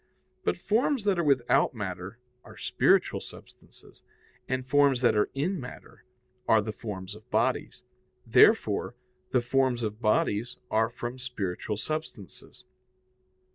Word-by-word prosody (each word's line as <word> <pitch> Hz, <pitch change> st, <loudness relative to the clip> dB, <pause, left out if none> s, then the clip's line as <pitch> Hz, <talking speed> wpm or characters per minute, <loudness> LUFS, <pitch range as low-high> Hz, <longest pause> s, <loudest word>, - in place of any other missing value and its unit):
But -, -, 0 dB
forms 235 Hz, +3 st, +1 dB
that 200 Hz, -4 st, +1 dB
are -, -, +2 dB
without 135 Hz, -3 st, +2 dB
matter 95 Hz, 0 st, -5 dB, 0.3 s
are -, -, -14 dB
spiritual -, -, +2 dB
substances, -, -, -15 dB, 0.5 s
and 130 Hz, 0 st, -2 dB
forms 140 Hz, -1 st, +3 dB
that 120 Hz, -, +4 dB
are 105 Hz, -, +2 dB
in 175 Hz, +7 st, -1 dB
matter 125 Hz, -1 st, -11 dB, 0.4 s
are 110 Hz, -, +5 dB
the 110 Hz, +1 st, -3 dB
forms 100 Hz, -3 st, -7 dB
of 110 Hz, +3 st, -15 dB
bodies. 120 Hz, +4 st, -1 dB, 0.4 s
Therefore, 120 Hz, -, +4 dB, 0.3 s
the 125 Hz, -, +2 dB
forms 125 Hz, -1 st, +1 dB
of 110 Hz, +1 st, -4 dB
bodies 110 Hz, +2 st, +1 dB
are 110 Hz, +1 st, +2 dB
from 120 Hz, +2 st, -6 dB
spiritual 105 Hz, -5 st, -4 dB
substances. 110 Hz, -, -7 dB
120 Hz, 130 wpm, -28 LUFS, 105-135 Hz, 0.5 s, are